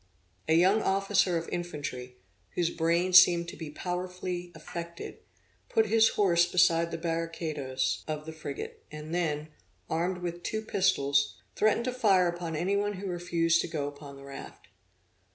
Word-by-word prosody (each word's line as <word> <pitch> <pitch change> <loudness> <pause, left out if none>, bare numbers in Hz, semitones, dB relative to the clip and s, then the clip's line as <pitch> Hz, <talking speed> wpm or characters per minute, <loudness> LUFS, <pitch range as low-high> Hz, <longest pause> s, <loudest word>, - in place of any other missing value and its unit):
A 160 - +4
young 190 +6 +4
officer 195 -2 +2
of 165 - -4
infantry, 145 -7 -5 0.4
whose 170 -1 +1
brain 170 +2 +1
seemed 175 -2 +7
to - - -8
be 160 -3 -7
powerfully 180 +1 -4
affected, 170 +2 -7 0.5
put 220 - +3
his 220 +1 +5
horse 175 -4 +4
beside 170 -2 +4
the 165 - -4
barricadoes 165 -5 -2
of 155 -1 -4
the 160 - -7
frigate, 145 -3 -7
and 155 +1 -7
then, 155 -3 -1 0.4
armed 180 +2 -1
with 175 0 -4
two 220 +4 -3
pistols, 140 -9 +1 0.2
threatened 215 +2 +2
to 255 - -1
fire 200 -8 +4
upon 170 -2 -3
any 180 +6 0
one 205 +1 0
who 195 +1 -7
refused 170 -2 +1
to - - -3
go 150 -3 -3
upon 145 -1 -9
the 140 - -12
raft. 140 0 -10
170 Hz, 155 wpm, -29 LUFS, 160-185 Hz, 0.5 s, seemed